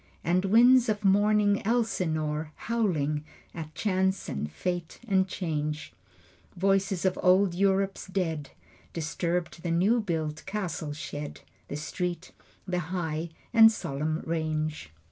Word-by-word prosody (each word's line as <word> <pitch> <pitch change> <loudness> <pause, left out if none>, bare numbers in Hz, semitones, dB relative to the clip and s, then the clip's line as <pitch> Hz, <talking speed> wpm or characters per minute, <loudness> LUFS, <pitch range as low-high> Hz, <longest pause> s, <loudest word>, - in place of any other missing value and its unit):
And 180 +3 +2
winds 240 +4 +6
of 210 -1 -1
mourning 205 +1 +4
Elsinore 160 -9 0
Howling 160 -11 0 0.3
at 155 -2 -7
chance 190 +1 0
and 75 +2 -3
fate 175 - -4
and 190 -2 +3
change; 155 -4 -3 0.6
Voices 195 0 +1
of 185 -1 +1
old 185 0 +4
Europe's 195 +1 +1
dead 165 -7 -2 0.4
Disturbed 170 +1 -2
the 175 - -3
new 190 +8 +3
built 160 -5 -2
cattle 180 -7 -3
shed, 150 0 -6 0.3
The 145 - -4
street, 175 +3 -4 0.4
the 180 -1 0
high 165 -2 -2 0.2
and 225 -1 +9
solemn 155 -5 -3
range. 155 - -2
180 Hz, 120 wpm, -28 LUFS, 155-195 Hz, 0.6 s, and